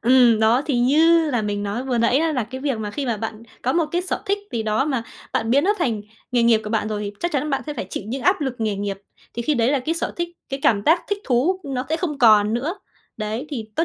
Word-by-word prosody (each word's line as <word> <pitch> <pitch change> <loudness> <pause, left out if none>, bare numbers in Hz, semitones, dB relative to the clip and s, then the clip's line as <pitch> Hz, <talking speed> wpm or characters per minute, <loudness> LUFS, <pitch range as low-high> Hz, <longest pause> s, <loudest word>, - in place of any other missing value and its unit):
Ừm, 240 -2 +5
đó, 230 +5 +4
thì 275 -6 +1
như 315 +5 +4
là 240 -4 0
mình 205 -1 -2
nói 210 +6 -3
vừa 250 -3 0
nãy 235 +4 +3
á 325 0 +1
là 250 -6 0
cái 260 +4 -8
việc 275 -5 -1
mà 210 -1 -4
khi 275 +4 -4
mà 235 - 0
bạn 220 +1 -5 0.2
có 255 - +1
một 330 -2 +2
cái 350 - +1
sở 370 - -3
thích 400 0 +1
gì 225 -2 -1
đó 220 +5 +1
mà 265 -6 -1 0.3
bạn 225 0 0
biến 280 +4 +4
nó 415 +3 +3
thành 235 - 0 0.3
nghề 240 -1 +3
nghiệp 230 -2 +4
của 210 - -5
bạn 220 -1 0
rồi, 210 -1 -3
thì 205 0 -4
chắc 345 -1 -1
chắn 295 +2 -1
bạn 275 - 0
sẽ 300 - -4
phải 185 - -4
chịu - - -4
những 260 +4 -4
áp 370 0 +3
lực 265 -4 -2
nghề 215 -2 -1
nghiệp. 200 -1 -3 0.4
Thì 235 - -3
khi 300 +4 +1
đấy 235 +1 +2
là 285 - +2
cái 310 +6 -2
sở 330 - -2
thích, 345 0 -2 0.2
cái 270 0 -4
cảm 200 -3 +3
giác 330 +3 +4
thích 405 0 -1
thú 295 +10 +1
nó 265 -2 -3
sẽ 320 - +1
không 320 -5 -3
còn 215 -2 +5
nữa. 290 +10 -1 0.4
Đấy, 220 +6 -3
thì 250 -7 -4
tốt 330 - +2
250 Hz, 285 wpm, -22 LUFS, 220-300 Hz, 0.4 s, Ừm